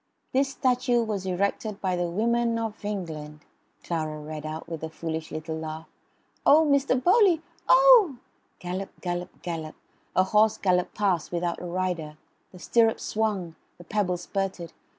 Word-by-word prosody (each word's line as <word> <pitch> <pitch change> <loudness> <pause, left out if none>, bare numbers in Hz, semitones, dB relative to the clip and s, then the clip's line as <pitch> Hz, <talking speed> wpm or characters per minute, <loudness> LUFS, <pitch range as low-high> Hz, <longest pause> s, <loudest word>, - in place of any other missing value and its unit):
"'This 270 +1 +2
statue 250 -2 +2
was 205 -4 -3
erected 200 +3 -1
by 185 -3 0
the 175 0 -1
women 230 +5 +1
of 225 -1 -4
England...'" 160 -7 -5 0.4
Clara 155 -2 -3
read 155 0 -6
out 155 +1 -6
with 165 -2 -6
a 160 - -3
foolish 160 0 -5
little 160 +1 -4
laugh. 160 0 -6 0.6
"Oh, 315 +2 +6
Mr. 280 -2 +3
Bowley! 365 -4 +5 0.3
Oh!" - - +7 0.4
Gallop 185 +2 -6
gallop 175 0 -5
gallop 160 -3 -5 0.4
a 185 - +5
horse 210 +3 +3
galloped 180 -2 +1
past 190 -6 0
without 175 0 -2
a - - -6
rider. 175 -4 -3 0.3
The 185 - -13
stirrups 225 +5 +2
swung; 205 -6 -1 0.2
the 175 - -12
pebbles 180 -2 -1
spurted. 190 -3 -3
185 Hz, 150 wpm, -26 LUFS, 165-225 Hz, 0.6 s, Oh